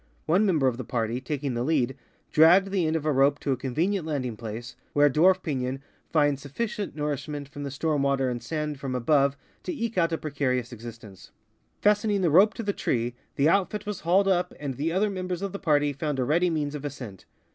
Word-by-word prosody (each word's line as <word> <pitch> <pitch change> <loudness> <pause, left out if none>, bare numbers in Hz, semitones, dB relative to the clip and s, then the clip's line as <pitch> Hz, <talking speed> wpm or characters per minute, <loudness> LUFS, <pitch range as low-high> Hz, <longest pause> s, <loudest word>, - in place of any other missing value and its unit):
One 190 +7 +3
member 160 -8 +2
of 120 -2 0
the 130 - -4
party, 115 +1 -2
taking 140 0 -3
the 120 - -2
lead, 135 -2 +1 0.4
dragged 180 +5 +6
the 185 -5 +1
end 160 - 0
of 155 -2 -2
a 155 - +2
rope 140 +1 +3
to 140 - -1
a - - +2
convenient 160 +10 -1
landing 135 -7 -3
place, 115 +2 -7 0.2
where 145 0 +5
a 145 - +4
dwarf 185 +6 +4
piiion 130 -3 -2 0.3
finds 145 -3 +2
sufficient 200 - -4
nourishment 145 -1 -3
from 145 0 -9
the 140 - -3
storm 145 +1 -1
water 140 -1 +1
and 120 -1 -3
sand 150 +3 -3
from 135 -2 -3
above 140 +2 +2 0.2
to - - -4
eke 230 - -2
out 165 -1 +2
a 165 - 0
precarious 130 -5 -2
existence. 115 -4 -11 0.5
Fastening 210 -1 +3
the 170 -4 +2
rope 200 +7 +6
to 230 - -4
the 200 -1 -1
tree, 120 -6 -1 0.2
the 140 - +3
outfit 200 +4 +1
was 205 -2 -4
hauled 185 +5 +3
up, 180 -2 +1
and 140 -2 -3
the 145 +6 -2
other 200 +4 +1
members 185 -1 -4
of 200 - -2
the 200 - -6
party 145 -4 +2
found 145 0 -3
a 130 - +1
ready 170 +7 +2
means 150 -3 -1
of 150 -2 -6
ascent. 125 -9 -7
145 Hz, 220 wpm, -26 LUFS, 130-180 Hz, 0.5 s, dragged